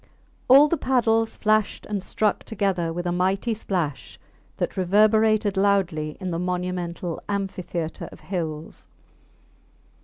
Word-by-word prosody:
All 275 +4 +8
the 335 - 0
paddles 225 -4 +1
flashed 215 -1 +1
and 205 -2 -3
struck 210 +2 -1
together 190 -6 -1
with 175 +2 -4
a 175 - 0
mighty 190 +6 0
splash 180 -9 -4 0.4
that - - -2
reverberated 210 +2 +3
loudly 190 -6 +1
in 185 -2 -4
the 165 - -2
monumental 180 -1 -3
amphitheatre 185 -5 -4
of - - -14
hills. 160 -4 -5
190 Hz, 120 wpm, -24 LUFS, 175-215 Hz, 0.4 s, All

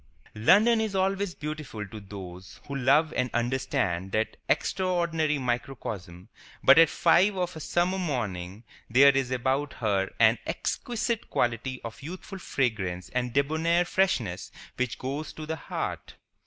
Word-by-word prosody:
London 210 - +5
is 215 -3 -2
always 195 0 0
beautiful 150 -8 -5
to 110 +1 -9
those 95 -3 -10
who 140 - -5
love 140 +4 +3
and 125 0 0
understand 120 - -1
that 110 +1 0
extraordinary 170 -5 +1
microcosm; 115 -8 -4 0.4
but 135 +4 +8
at 165 -2 +7
five 190 +4 +4
of 180 -1 -2
a - - -6
summer 175 +4 0
morning 105 - -3 0.3
there 135 +4 +6
is 135 -2 +1
about 130 +3 0
her 100 -4 0
an 115 0 +5
exquisite 235 -1 -2
quality 120 +2 -1
of 115 +3 -8
youthful 185 +5 -8
fragrance 100 - -2
and 125 -1 -2
debonair 160 +6 +2
freshness 120 - 0 0.2
which 125 -2 -2
goes 140 +4 -4
to 155 - -7
the 160 +1 -3
heart. 160 - -5
135 Hz, 140 wpm, -27 LUFS, 110-170 Hz, 0.4 s, but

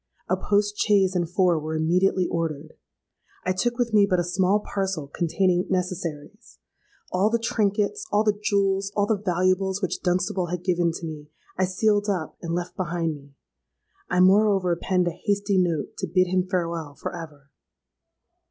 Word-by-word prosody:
A 185 - +2
post 205 +2 0
chaise 195 -3 +3
and 175 -2 0
four 180 -2 +2
were 155 +1 -4
immediately 180 +3 +2
ordered: 160 -3 -3 0.7
I 185 - +2
took 235 +6 -1
with 240 -3 -1
me 205 -1 +5
but 185 -2 +2
a - - +1
small 190 +3 +2
parcel 190 -6 -3
containing 175 +4 0
necessaries;—all 180 +2 -4
the 235 - +2
trinkets, 220 - -1
all 210 +1 +3
the 210 -1 +3
jewels, 195 -1 +1
all 205 - +3
the 210 -1 0
valuables 185 +1 +1
which 185 -4 -3
Dunstable 180 0 0
had 175 0 -4
given 175 -2 +1
to 170 - -6
me, 150 -2 -8 0.3
I 190 - +2
sealed 205 +2 +1
up 180 -6 -2
and 170 -1 -3
left 175 0 -4
behind 170 -2 -1
me. 140 -1 -14 0.7
I 180 0 +2
moreover 190 -2 +4
penned 180 +1 0
a - - +1
hasty 200 +2 0
note 170 -5 -1
to 190 - -2
bid 185 +2 +3
him 185 0 0
farewell 170 -5 -2
for - - -6
ever! 145 -4 -10
185 Hz, 165 wpm, -25 LUFS, 170-200 Hz, 0.7 s, me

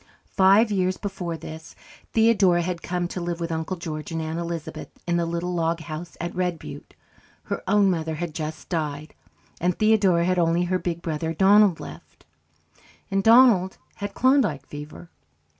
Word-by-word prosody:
Five 200 +3 +5
years 185 -2 0
before 180 -5 -4
this, 160 0 -10 0.4
Theodora 205 -6 +4
had 175 -1 -3
come 180 -1 -2
to 180 - -5
live 170 0 -3
with 170 0 -3
Uncle 160 +3 -3
George 155 -2 -6
and 165 - -2
Aunt 160 +1 -3
Elizabeth 170 -2 -5 0.2
in 175 0 0
the 170 -1 0
little 170 +1 -3
log 165 -1 0
house 160 +2 -8
at 170 +1 -4
Red 180 -2 -1
Butte. - - -11 0.5
Her - - -4
own 200 0 +4
mother 160 -2 -2
had 170 0 -4
just 155 0 -6
died, 150 -3 -3 0.5
and 180 0 0
Theodora 200 -6 +3
had 185 0 +1
only 170 +1 +2
her 185 +1 0
big 170 -1 -4
brother 160 0 -3
Donald 200 0 +5
left, - - -12 0.9
and 195 0 +2
Donald 225 -5 +5 0.2
had 205 -1 -5
Klondike 255 - +2
fever. 150 +3 -10
175 Hz, 165 wpm, -24 LUFS, 165-190 Hz, 0.9 s, Five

